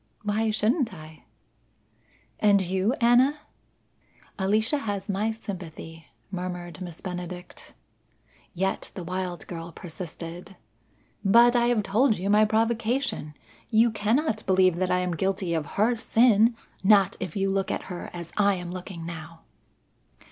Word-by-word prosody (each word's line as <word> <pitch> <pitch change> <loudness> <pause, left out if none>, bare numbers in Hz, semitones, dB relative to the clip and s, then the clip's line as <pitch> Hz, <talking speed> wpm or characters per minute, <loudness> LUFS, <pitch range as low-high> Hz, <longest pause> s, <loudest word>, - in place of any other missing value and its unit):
"Why 215 +2 0
shouldn't 225 - +1
I?" 155 -1 -13 1.1
"And 205 -1 +5
you, 190 +4 0
Anna?" 250 +5 +4 1.0
"Alicia 215 +8 +2
has 205 -5 -4
my 205 +2 0
sympathy," 175 -7 -8 0.2
murmured 180 -2 -5
Miss 175 -3 -8
Benedict. 180 -1 -7 0.8
Yet 190 +2 -1
the 185 - -5
wild 180 0 -4
girl 170 -1 -7
persisted. 175 +2 -8 0.7
"But 235 +4 +6
I 240 0 +3
have 240 -3 +2
told 220 +4 +2
you 195 +3 -1
my 210 +1 +6
provocation. 225 - 0 0.3
You 225 +1 +4
cannot 220 +3 0
believe 185 -2 +4
that 185 0 0
I 180 - +2
am 180 -2 -1
guilty 190 0 -1
of 160 -3 -1
her 225 +4 +3
sin; 230 0 +4 0.3
not 195 -1 +5
if 160 - -5
you 195 -1 +1
look 195 0 0
at - - -2
her 180 -2 -7
as 170 -1 -8
I 200 -1 +4
am 175 -1 -6
looking 180 -2 -7
now." 165 0 -8
195 Hz, 135 wpm, -26 LUFS, 175-220 Hz, 1.1 s, But